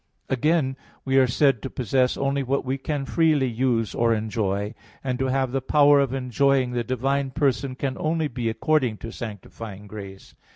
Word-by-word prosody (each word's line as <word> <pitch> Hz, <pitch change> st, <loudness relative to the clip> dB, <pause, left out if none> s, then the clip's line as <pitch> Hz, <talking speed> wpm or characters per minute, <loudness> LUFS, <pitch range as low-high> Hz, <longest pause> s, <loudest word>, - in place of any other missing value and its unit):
Again, 135 Hz, 0 st, +1 dB, 0.3 s
we 135 Hz, 0 st, +4 dB
are 130 Hz, -, +5 dB
said 135 Hz, -1 st, +2 dB
to 135 Hz, -, -5 dB
possess 125 Hz, +1 st, +1 dB
only 140 Hz, 0 st, 0 dB
what 135 Hz, +1 st, -1 dB
we 130 Hz, +2 st, -2 dB
can 140 Hz, 0 st, -3 dB
freely 155 Hz, -3 st, +2 dB
use 120 Hz, -2 st, 0 dB
or 115 Hz, -1 st, +2 dB
enjoy: 105 Hz, -1 st, -2 dB, 0.3 s
and 130 Hz, -2 st, -2 dB
to 130 Hz, -, +1 dB
have 130 Hz, -1 st, 0 dB
the 135 Hz, +1 st, -1 dB
power 145 Hz, +2 st, +5 dB
of 135 Hz, -3 st, +1 dB
enjoying 130 Hz, 0 st, +1 dB
the 120 Hz, -1 st, -1 dB
divine 135 Hz, +3 st, -1 dB
person 135 Hz, -2 st, 0 dB
can 130 Hz, 0 st, -2 dB
only 160 Hz, 0 st, 0 dB
be 120 Hz, -3 st, -2 dB
according 125 Hz, -1 st, +1 dB
to 115 Hz, -, -7 dB
sanctifying 105 Hz, -2 st, -8 dB
grace. 100 Hz, -2 st, -10 dB
130 Hz, 175 wpm, -24 LUFS, 115-140 Hz, 0.3 s, are